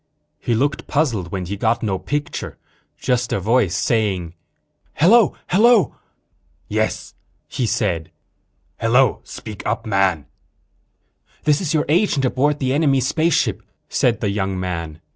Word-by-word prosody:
He 120 - 0
looked 140 +4 -1
puzzled 115 - 0
when 95 -2 -3
he 100 +4 -4
got 115 +4 0
no 95 -4 -1
picture, 145 0 -4 0.4
just 125 -2 -1
a - - 0
voice 105 -2 +2
saying, 95 -7 0 0.6
"Hello, 210 +6 +5
hello." 215 - +4 0.7
"Yes?" - - -2 0.3
he 125 - -2
said. 80 -6 -1 0.7
"Hello. 120 +2 +3
Speak 105 -3 -9
up, 115 +2 -2
man." 95 -7 +1 1.2
"This 150 +2 +2
is 165 -3 -1
your 150 - +1
agent 155 -3 +2
aboard 140 +4 +1
the 130 -2 -1
enemy 140 -2 +3
spaceship," 155 +6 +1 0.3
said - - +1
the 100 - 0
young 95 -2 -2
man. 85 -4 -4
120 Hz, 130 wpm, -20 LUFS, 95-145 Hz, 1.2 s, Hello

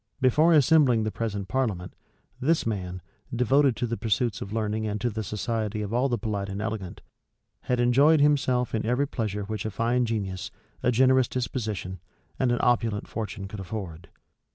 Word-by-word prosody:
Before 145 +6 +4
assembling 145 -6 +5
the 110 - -1
present 105 -4 -3
parliament, 100 -8 -2 0.5
this 155 +5 +1
man, 90 -5 -3 0.3
devoted 125 +2 +3
to - - -2
the 115 0 -3
pursuits 110 -2 0
of 100 - -6
learning 110 0 -1
and 105 0 -2
to 120 +1 -1
the 110 +1 -3
society 110 0 -2
of 105 +2 -5
all 125 +3 +2
the 120 - 0
polite 105 -3 -3
and 100 +1 -4
elegant, 105 -4 -4 0.6
had 125 -1 0
enjoyed 140 +6 +5
himself 135 -4 +2
in 110 - 0
every 125 +5 +1
pleasure 105 -5 -3
which 105 0 -4
a 110 - -2
fine 120 +4 0
genius, 95 -5 -3 0.3
a 125 - +2
generous 130 +1 +4
disposition, 110 -7 -3 0.4
and 130 -2 +2
an 120 - +2
opulent 115 -4 +1
fortune 100 -3 -5
could 100 +1 -8
afford. 90 -4 -6
115 Hz, 175 wpm, -26 LUFS, 105-125 Hz, 0.6 s, assembling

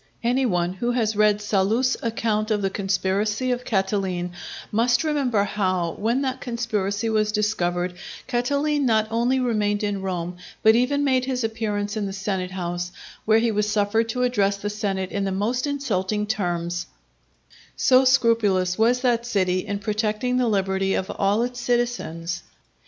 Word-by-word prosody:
Any 250 +2 +2
one 175 -3 0
who 240 +6 -1
has 220 -3 0
read 210 0 +3
Sallust's 215 +6 +2
account 220 -2 -1
of 210 -2 0
the 195 - 0
conspiracy 200 +5 0
of 245 0 -2
Catiline, 190 -4 -1 0.4
must 240 +6 +2
remember 275 -9 +1
how, 185 -4 0
when 235 - 0
that 260 -1 -2
conspiracy 225 -4 -2
was 215 -1 +1
discovered, 180 -4 0 0.3
Catiline 285 +4 0
not 220 -2 +3
only 240 +3 +2
remained 210 -4 0
in 205 -2 -1
Rome, 180 -2 -3 0.3
but 220 - +7
even 275 +4 +2
made 260 -2 +2
his 255 -2 -2
appearance 210 -2 -2
in 210 -2 -2
the 195 - -5
senatehouse, 185 -3 -3 0.4
where 220 0 +5
he 230 0 +2
was 210 0 0
suffered 210 +2 +1
to 250 +2 -1
address 205 -5 +1
the 205 +1 -4
senate 195 -3 -2
in 200 - -1
the 195 - -1
most 230 +8 -1
insulting 210 -8 -1
terms,—so 170 - -2
scrupulous 225 -8 +3
was 240 +3 +3
that 240 -2 +2
city 185 -6 +1
in 205 - -2
protecting 215 +4 -1
the 250 -1 +2
liberty 195 -2 +1
of 190 - -2
all 205 +3 +1
its 245 0 -4
citizens. 235 -9 -1
210 Hz, 155 wpm, -24 LUFS, 190-240 Hz, 0.4 s, but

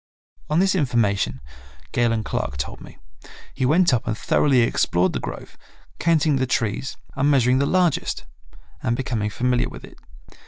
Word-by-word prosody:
On 155 - +1
this 190 +2 +3
information, 105 - 0 0.5
Galen 115 -3 +1
Clark 65 -9 -3
told 65 -1 -5
me, - - -13 0.6
he 130 -1 0
went 170 +1 +4
up 120 - 0
and 110 -2 -1
thoroughly 135 0 +3
explored 90 -5 +1
the - - -2
grove, - - -8 0.4
counting 155 -3 +2
the 130 0 0
trees 120 +2 -2 0.2
and 140 +1 +2
measuring 130 -2 +3
the 140 - +1
largest, 180 -4 +1 0.6
and 120 - 0
becoming 115 -5 -2
familiar 125 +3 0
with - - -11
it. - - -14
125 Hz, 155 wpm, -22 LUFS, 115-145 Hz, 0.6 s, went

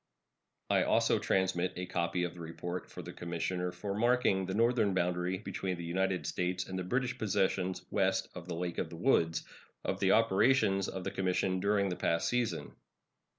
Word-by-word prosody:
I - - +4
also - - +3
transmit 95 -1 +1
a 90 - -3
copy 90 0 -1
of 90 - -2
the 90 - -12
report 85 +2 -5
of - - -6
the - - -7
commissioner 90 +1 -2
for 100 +3 -4
marking 115 -4 +2
the 95 - -2
northern 115 -3 +3
boundary 90 +1 0
between 95 -2 -4
the 85 - -6
United 90 -1 0
States 90 +3 -1
and 95 0 -4
the - - -2
British 125 +6 -1
possessions 95 -3 0
west - - +1
of 85 -1 -9
the 85 - -3
Lake 85 0 -3
of - - -2
the 85 - -8
Woods, 85 -7 +2 0.4
of - - -1
the 95 0 +4
operations 105 -2 +3
of 95 - -5
the - - -3
commission 95 0 0
during 100 0 +2
the 90 - -2
past 85 -2 0
season. 125 -2 -1
95 Hz, 185 wpm, -32 LUFS, 90-100 Hz, 0.4 s, I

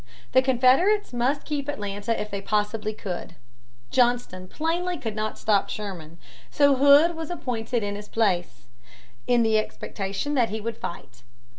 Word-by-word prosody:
The 260 - +5
Confederates 265 - +3
must 255 +4 0
keep 290 -2 -3
Atlanta 205 -4 -3
if 210 - -5
they 200 0 -3
possibly 210 +1 -1
could. 180 -5 -6 0.6
Johnston 240 -7 +1
plainly 340 - -2
could 225 -6 -5
not 215 0 -3
stop 205 -2 +1
Sherman. 175 -6 -6 0.3
So 285 -2 +4
Hood 285 +5 +6
was 320 -1 -6
appointed 245 -8 -2
in 205 0 -2
his 205 0 -8
place, 180 - 0 0.6
in 245 -1 +4
the 220 -1 +3
expectation 200 +5 -4
that 245 -5 +2
he 220 - -3
would 225 +1 -4
fight. 130 -8 -8
225 Hz, 150 wpm, -25 LUFS, 205-280 Hz, 0.6 s, Hood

